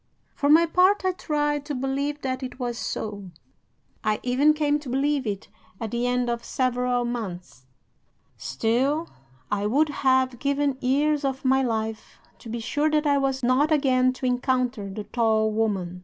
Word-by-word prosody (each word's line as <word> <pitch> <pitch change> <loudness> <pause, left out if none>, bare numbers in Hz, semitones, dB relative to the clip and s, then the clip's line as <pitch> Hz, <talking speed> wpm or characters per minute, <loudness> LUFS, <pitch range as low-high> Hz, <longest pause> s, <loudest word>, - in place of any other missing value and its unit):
"'For 285 - 0
my 325 +3 +7
part, 370 +4 +3
I 375 - +3
tried 295 -4 -1
to 290 -1 -4
believe 275 +3 -2
that 260 0 -3
it 255 -1 -6
was 240 -2 -2
so. 205 -3 -4 0.7
I 215 -1 +1
even 275 +5 +3
came 295 -1 +1
to 290 -3 -9
believe 275 0 0
it 200 -2 -4 0.3
at 225 -2 -4
the 240 +1 -1
end 250 0 0
of 235 0 -2
several 250 -2 0
months. 180 - -6 0.7
Still, 255 - -1 0.4
I 205 0 0
would 295 +8 +2
have 260 -3 +1
given 280 -1 0
years 290 +3 +1
of 270 0 -2
my 265 +1 +4
life 220 -3 -3 0.2
to 230 - -11
be 235 +1 -3
sure 290 +6 0
that 305 0 +1
I 285 -1 +3
was 270 -1 -1
not 260 +5 +3
again 260 -4 +3
to 255 - -6
encounter 250 -4 0
the 210 +2 -5
tall 220 -1 +1
woman. 195 -5 -1
255 Hz, 170 wpm, -25 LUFS, 230-290 Hz, 0.7 s, my